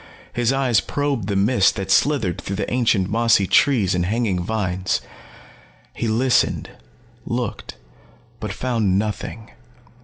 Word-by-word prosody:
His 120 0 +1
eyes 130 -5 +2
probed 140 -7 -2
the 100 - -1
mist 100 +1 +3
that 95 0 -4
slithered 115 - +2
through 100 - -4
the 100 +3 -3
ancient 115 -7 +2
mossy 115 -2 +3
trees 105 -3 +3
and 90 -1 0
hanging 105 -4 0
vines. 95 -2 -1 0.9
He 115 - -3
listened, 120 +2 +1 0.5
looked, 120 - -4 0.6
but 105 - -4
found 110 -4 0
nothing. 110 +1 -4
110 Hz, 125 wpm, -21 LUFS, 95-120 Hz, 0.9 s, mist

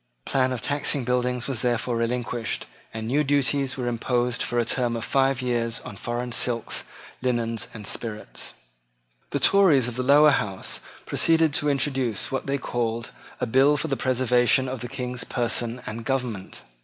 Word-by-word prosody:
The - - -7
plan 130 -1 +2
of 125 -3 -3
taxing 145 -1 +1
buildings 125 0 0
was 130 -5 -1
therefore 120 0 0
relinquished; 120 -1 -2 0.3
and 110 0 -5
new 145 +5 +2
duties 140 -1 +1
were 125 -2 -2
imposed 120 0 0
for 120 - -1
a 120 - +2
term 120 0 0
of 115 - -3
five 135 -1 +2
years 115 -2 0
on 105 - -9
foreign 120 +3 -4
silks, 115 -1 0 0.4
linens, 115 -3 -1
and 105 -2 -9
spirits. 105 - -4 0.7
The - - -1
Tories 165 -11 +5
of 120 0 -5
the - - 0
Lower 145 +3 +6
House 95 -8 -2 0.3
proceeded 165 -2 +3
to 150 - +1
introduce 130 -5 0
what 135 0 -2
they 140 0 +1
called 115 -3 -2 0.3
a - - 0
bill 135 +5 +4
for 160 +2 -1
the 135 - +1
preservation 130 0 +3
of 130 0 -4
the 120 - -4
King's 125 -1 -3
person 120 0 -1
and 115 +2 -5
government. 120 -6 -3
125 Hz, 170 wpm, -25 LUFS, 115-135 Hz, 0.7 s, Lower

